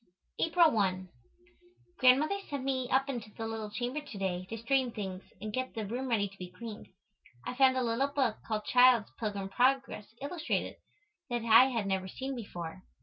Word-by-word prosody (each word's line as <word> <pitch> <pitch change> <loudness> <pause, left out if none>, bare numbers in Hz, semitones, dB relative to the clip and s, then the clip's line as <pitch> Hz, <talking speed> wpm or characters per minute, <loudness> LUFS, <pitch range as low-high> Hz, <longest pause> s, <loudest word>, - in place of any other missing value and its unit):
April 330 -1 +4
1. 185 -3 0 0.9
Grandmother 280 +9 +5
sent 280 -2 -3
me 260 -2 -1
up 270 +1 +2
into 240 -6 -4
the 225 - -4
little 225 -1 -4
chamber 245 +7 -3
to 285 -8 -10
day 185 -2 -2
to 225 - -4
straighten 250 +2 +1
things 190 -4 -5 0.2
and 215 0 -6
get 255 +1 -3
the 220 -2 -3
room 245 +6 -3
ready 210 -4 +2
to 195 0 -16
be 180 -1 -6
cleaned. 215 +3 -9 0.6
I - - -3
found 260 0 +4
a 255 - +1
little 235 +4 +1
book 270 -6 0
called 215 -1 -2
"Child's 250 -3 +5
Pilgrim 205 -3 -3
Progress, 260 -1 +1
Illustrated," 315 +4 -2 0.5
that 240 -1 -2
I 230 +3 +8
had 235 -6 -1
never 190 -1 -1
seen 265 +7 -5
before. 180 -6 -7
235 Hz, 180 wpm, -31 LUFS, 205-265 Hz, 0.9 s, I